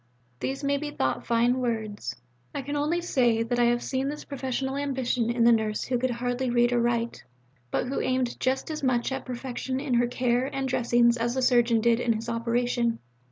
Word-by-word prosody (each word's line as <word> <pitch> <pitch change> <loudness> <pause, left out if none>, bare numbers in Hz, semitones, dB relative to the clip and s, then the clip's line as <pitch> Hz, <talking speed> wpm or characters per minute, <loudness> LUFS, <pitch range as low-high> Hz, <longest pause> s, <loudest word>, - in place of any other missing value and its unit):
These 270 +2 -3
may 280 0 +1
be 295 +1 -4
thought 130 - -2
fine 240 +2 +3
words. 215 - -3 0.4
I 275 - -2
can 285 +2 -4
only 305 +4 0
say 240 -9 +2
that 240 +1 -1
I 240 - +5
have 240 0 +2
seen 265 +1 -1
this 300 +1 -6
professional 265 -1 -3
ambition 260 -4 -1
in 235 0 +1
the 235 - +7
nurse 220 -2 +1
who 250 -1 -1
could 255 +1 0
hardly 245 +1 -1
read 240 0 +3
or 240 - +2
write, 235 0 -1 0.5
but - - 0
who 270 - -1
aimed 255 -1 -1
just 265 +4 0
as 310 0 -4
much 255 -2 +1
at 265 - -4
perfection 260 +1 -4
in 275 -2 -2
her 240 0 +3
care 245 +1 +1
and 270 -1 -2
dressings 240 -1 +3
as 235 +1 -1
the 260 - 0
surgeon 240 -2 +4
did 235 0 +3
in 235 -1 +2
his 225 +2 -5
operation. 235 0 0
245 Hz, 205 wpm, -27 LUFS, 235-265 Hz, 0.5 s, the